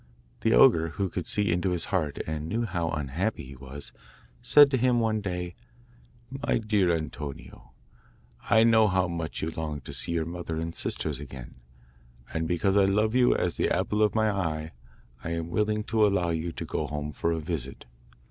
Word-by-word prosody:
The 115 - +2
ogre, 85 -12 +6
who 100 -2 0
could 90 0 -4
see 105 -3 +1
into 90 +2 +1
his 90 -2 -1
heart 80 -6 0
and 80 0 -4
knew 115 +4 0
how 85 -5 -2
unhappy 80 +8 -2
he 70 +1 -11
was, 65 +2 -8 0.5
said 145 -1 +7
to 130 - +2
him 125 0 +3
one 110 -2 +1
day: 90 -3 -4 0.8
'My 135 +1 0
dear 105 -5 +2
Antonio, 75 -3 -6 0.8
I 110 0 +6
know 110 -1 +5
how 95 -2 +2
much 85 -2 -4
you 80 - -1
long 80 -2 -4
to - - -9
see 85 - -3
your 80 -1 0
mother 85 -1 -5
and 80 +1 -3
sisters 75 -4 -3
again, 65 -3 -9 0.8
and 80 0 -1
because 95 +3 +1
I 100 -1 +5
love 105 +3 +2
you 125 -1 +4
as 90 -3 -1
the - - +1
apple 105 0 0
of 105 0 +3
my 110 -1 +3
eye, 80 -5 -2 0.5
I 85 - -3
am 85 0 -4
willing 105 +2 0
to 110 0 +1
allow 90 -4 +1
you 85 +1 -2
to - - -6
go 75 - -2
home 75 +1 -4
for 85 +4 -1
a 80 - -1
visit. 75 -5 -4
85 Hz, 190 wpm, -27 LUFS, 80-105 Hz, 0.8 s, said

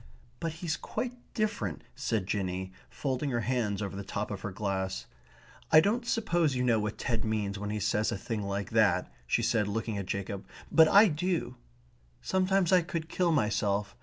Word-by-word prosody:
"But 165 -2 -2
he's 160 0 -3
quite 250 -1 -3 0.2
different," 205 - -1
said 110 -5 -1
Jinny, 95 -1 -2 0.2
folding 135 +1 -2
her 120 -2 0
hands 110 -3 0
over 100 -1 -4
the 100 - -5
top 100 +2 -3
of 100 - -5
her 105 - -3
glass. 95 -1 -2 0.7
"I 155 - +9
don't 230 +8 +1
suppose 170 - +1
you 125 - 0
know 120 -3 +3
what 105 0 -3
Ted 115 -4 -1
means 105 -3 -1
when 105 0 -4
he 105 0 -2
says 105 +2 +1
a 115 - -2
thing 105 +3 -3
like 100 0 -3
that," - - +3 0.2
she - - +1
said, 105 -3 +2
looking 110 0 -2
at 95 - -5
Jacob. 100 0 -4 0.2
"But 160 -1 +7
I 205 +6 +8
do. 175 +1 -1 0.6
Sometimes 190 -1 +2
I 185 -1 +6
could 165 -1 -4
kill 180 -2 +1
myself. 105 -6 +1
110 Hz, 185 wpm, -30 LUFS, 100-165 Hz, 0.7 s, I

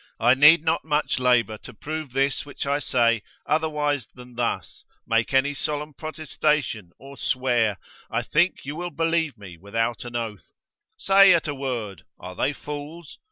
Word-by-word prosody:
I 120 +2 +5
need 150 +4 +7
not 165 0 +1
much 150 -3 0
labour 115 -4 +2
to 125 - -12
prove 155 +3 -5
this 135 +2 0
which 145 0 -6
I 140 +1 +1
say 115 -5 +2 0.2
otherwise 150 -5 0
than 125 0 -13
thus, 120 0 -3 0.2
make 115 0 +1
any 135 +2 +3
solemn 150 +1 -3
protestation, 150 - -2
or 140 +1 -12
swear, 120 -7 +1 0.3
I 115 +1 -1
think 170 +8 +1
you 145 +2 -5
will 175 +2 -4
believe 165 -2 0
me 95 -4 -11
without 115 +6 -2
an 120 -1 -8
oath; 110 -4 -5 0.4
say 195 -1 +6
at 165 - -1
a 145 - -2
word, 120 -8 -4 0.2
are 90 0 -9
they 140 - +1
fools? 150 +3 -8
140 Hz, 160 wpm, -24 LUFS, 115-150 Hz, 0.4 s, need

